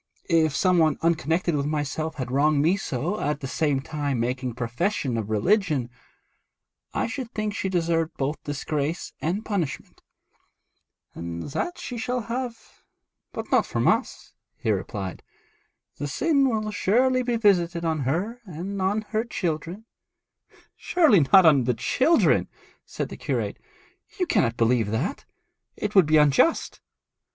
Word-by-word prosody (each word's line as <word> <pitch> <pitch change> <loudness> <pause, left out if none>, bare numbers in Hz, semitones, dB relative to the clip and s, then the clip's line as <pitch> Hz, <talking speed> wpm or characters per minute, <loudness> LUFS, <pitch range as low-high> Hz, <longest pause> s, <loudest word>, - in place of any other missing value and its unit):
If 160 -3 +3
some 180 -2 +3
one 155 -1 +3
unconnected 165 +1 +1
with 140 0 -1
myself 155 +1 -2
had 130 -2 -5
wronged 145 +2 +3
me 170 +5 +3
so, 170 - -3
at 150 0 -1
the 135 - -5
same 145 -1 0
time 145 -3 -3
making 125 0 -2
profession 125 - -1
of 110 -2 -3
religion, 145 - +1 1.0
I - - -1
should 250 +1 -5
think 215 -1 -2
she 190 - -2
deserved 165 -2 0
both 145 +3 -2
disgrace 145 +2 -3
and 185 +7 -2
punishment.' 180 -10 -3 1.1
'And 85 0 -6
that 350 - -2
she 245 -2 -6
shall 250 +1 -1
have, 235 +1 -6 0.5
but - - -7
not - - +3
from - - 0
us,' - - 0 0.2
he 120 -7 -1
replied. 95 -2 -4 0.8
'The 145 - -2
sin 275 - +2
will 215 -2 -1
surely 255 +6 +2
be 245 -1 -1
visited 175 -6 +2
on 160 -1 0
her 180 - -2
and 190 +3 -5
on 200 +3 +1
her 220 0 0
children.' 180 -2 -4 0.9
'Surely 315 - +4
not 190 -2 +8
on 140 -6 +5
the 125 -1 +1
children,' 260 - +3 0.4
said - - -4
the - - -8
curate. - - -2 0.6
'You 360 - +2
cannot 175 - +1
believe 115 -2 +2
that. 120 - -2 0.5
It 210 0 -3
would 190 -6 +6
be 155 0 +4
unjust.' 150 - +3
165 Hz, 145 wpm, -25 LUFS, 140-210 Hz, 1.1 s, not